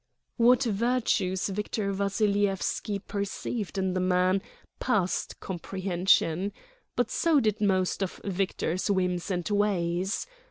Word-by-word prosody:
What 245 +2 +5
virtues 220 -4 +1
Victor 200 0 -2
Vassilyevski 200 0 0
perceived 200 0 -3
in 190 -1 0
the 185 - 0
man 185 +1 +2 0.4
passed 200 -8 0
comprehension. 185 0 0 0.4
But 245 -2 0
so 325 -3 +3
did 215 -4 0
most 190 -2 +1
of 190 - -3
Victor's 185 -2 -1
whims 180 -2 0
and 180 -3 -1
ways. 195 -3 0
195 Hz, 110 wpm, -28 LUFS, 185-210 Hz, 0.4 s, What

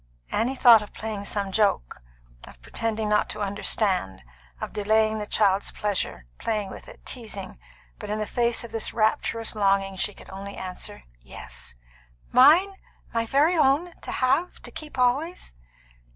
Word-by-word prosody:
Annie 245 +5 0
had - - -12
thought 230 -3 +9
of 210 - -10
playing 215 -2 -5
some 200 -1 -1
joke; 185 - +1 0.4
of 65 - -15
pretending 220 - -2
not 210 0 +2
to 210 - -4
understand; 195 - 0 0.4
of - - -5
delaying 215 +1 +2
the 210 - -5
child's 200 -2 +2
pleasure; 205 - -3
playing 210 -3 -2
with - - -10
it; - - -14
teasing. 215 - -6 0.4
But - - -7
in 210 - -1
the 215 - -2
face 235 +1 0
of 235 - -9
this 225 - -2
rapturous 225 0 +1
longing, 195 -2 +1
she 205 +2 -1
could - - -13
only 200 +1 -8
answer, 180 - -5 0.2
"Yes." 60 0 -9 0.6
"Mine? 315 +11 +6 0.4
My 230 0 0
very 295 +8 +3
own? 310 +3 +3
To - - -6
have? 270 +8 +1
To - - -9
keep 300 -3 -9
always?" 260 - 0
215 Hz, 160 wpm, -25 LUFS, 200-245 Hz, 0.6 s, thought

